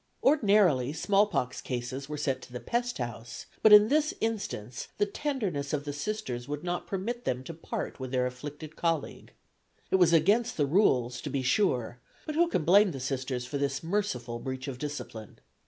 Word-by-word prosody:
Ordinarily 200 - +4
small 200 +6 +3
pox 125 -11 -2
cases 130 +2 -4
were 150 - -4
sent 135 -3 -1
to 125 - -13
the 125 - -5
pest 240 - -2
house, 120 -1 -6 0.2
but 220 - +6
in 210 0 +10
this 305 +4 +2
instance 135 - -3
the 205 - +3
tenderness 200 - -3
of 145 -1 0
the 145 - -3
Sisters 145 - -4
would 145 +2 -4
not 175 0 -3
permit 230 +6 -3
them 125 0 -2
to 165 - -7
part 160 - -5
with 130 -1 -5
their 125 0 +1
afflicted 145 +5 -7
colleague. 165 -3 -2 0.6
It - - +5
was 175 -3 +5
against 205 +9 +3
the 145 - +3
rules, 130 - +2
to - - -5
be 135 -2 -1
sure, 125 - +1 0.3
but 310 - -3
who 340 +3 +3
can 180 - 0
blame 195 +1 +6
the 135 - -5
Sisters 130 -1 -3
for 140 +3 -4
this 140 0 -1
merciful 130 - -2
breach 130 +1 -5
of 130 -2 -5
discipline? 135 -7 -6
150 Hz, 190 wpm, -29 LUFS, 130-205 Hz, 0.6 s, in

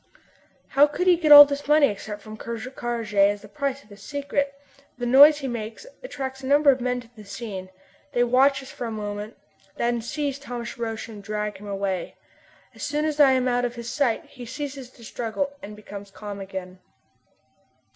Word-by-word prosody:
How 285 +2 +5
could 325 +5 -2
he 365 -1 +6
get 320 -3 +1
all 290 0 +13
this 285 0 -5
money 300 0 +6
except 210 -1 -6
from 215 0 -9
Ker 235 +2 -6
Karraje, 235 -2 -5
and 200 0 +5
as 205 0 -13
the - - -11
price 280 +3 -3
of 210 - -25
his 200 0 -13
secret? 280 +2 -2 0.5
The 245 - -3
noise 285 +5 +8
he 275 -2 -4
makes 230 - -6 0.2
attracts 265 - -6
a 260 - -6
number 285 +1 +5
of 260 -1 -2
men 250 0 -1
to 235 -1 -19
the 215 - -12
scene. 200 -3 -7 0.4
They 245 - +3
watch 265 +3 +3
us 265 - -11
for 245 - -6
a - - -5
moment, 210 0 -5 0.4
then 235 0 0
seize 280 +3 -3
Thomas 245 -4 -6
Roch 225 -1 -4
and 215 -3 -10
drag 210 0 -4
him 205 +2 -11
away. 195 -2 -3 0.6
As - - -14
soon 295 +1 -1
as 305 -1 -2
I 275 -3 +7
am 255 -1 +1
out 245 0 +1
of 245 0 -2
his 235 0 -6
sight 265 -6 0
he 250 - -12
ceases 270 +1 -6
to 240 - -18
struggle 245 +5 -3
and 210 -3 -9
becomes 205 -1 -10
calm 205 0 -8
again. 190 -1 -7
240 Hz, 205 wpm, -24 LUFS, 210-280 Hz, 0.6 s, all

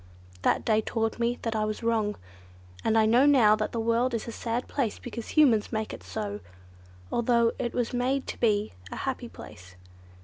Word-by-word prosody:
That - - +1
day 220 -1 +3
taught 225 0 -2
me 240 +1 0 0.2
I 215 -1 0
was 215 +2 -3
wrong, 220 -2 +1 0.7
and 225 - +2
I 220 - +5
know 240 +6 +5
now 235 -7 +6
that 215 0 -2
the 230 - -3
world 230 +2 +1
is 225 - -4
a - - -4
sad 235 +2 -3
place 245 -7 -1
because 235 -2 -7
Humans 245 -9 +4
make 220 -1 -2
it - - -8
so; 100 +3 -5 0.7
although 235 -1 +3
it 240 - -2
was 245 0 -1
made 260 +2 0
to - - -6
be 210 -2 +1 0.2
a - - -5
happy - - -4
place. 90 +1 -12
230 Hz, 190 wpm, -27 LUFS, 215-240 Hz, 0.7 s, now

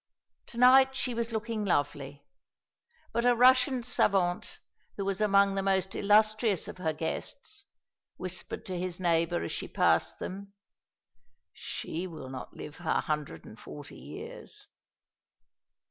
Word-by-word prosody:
To 235 - -11
night 265 +2 +6
she 255 -2 -1
was 235 0 -2
looking 220 -1 -2
lovely; 145 -5 -1 0.9
but 235 +1 +1
a 245 0 +4
Russian 255 +1 +5
savant, 195 -6 +1 0.4
who 200 - -2
was 195 +1 -1
among 200 -1 +4
the 195 - 0
most 190 -1 +1
illustrious 215 -1 +3
of - - -9
her 160 -3 0
guests, 400 - -5 0.5
whispered 185 0 -5
to 185 -2 -4
his 180 0 -3
neighbour 170 -1 +1
as - - -4
she - - -4
passed - - +2
them, 200 +1 -7 1.0
"She 175 +4 -5
will 160 -7 -9
not 130 -1 -8
live 150 - -8
her 175 -2 0
hundred 150 -2 -4
and 110 - -12
forty 145 -1 -10
years." 430 -1 -10
195 Hz, 135 wpm, -30 LUFS, 170-235 Hz, 1.0 s, night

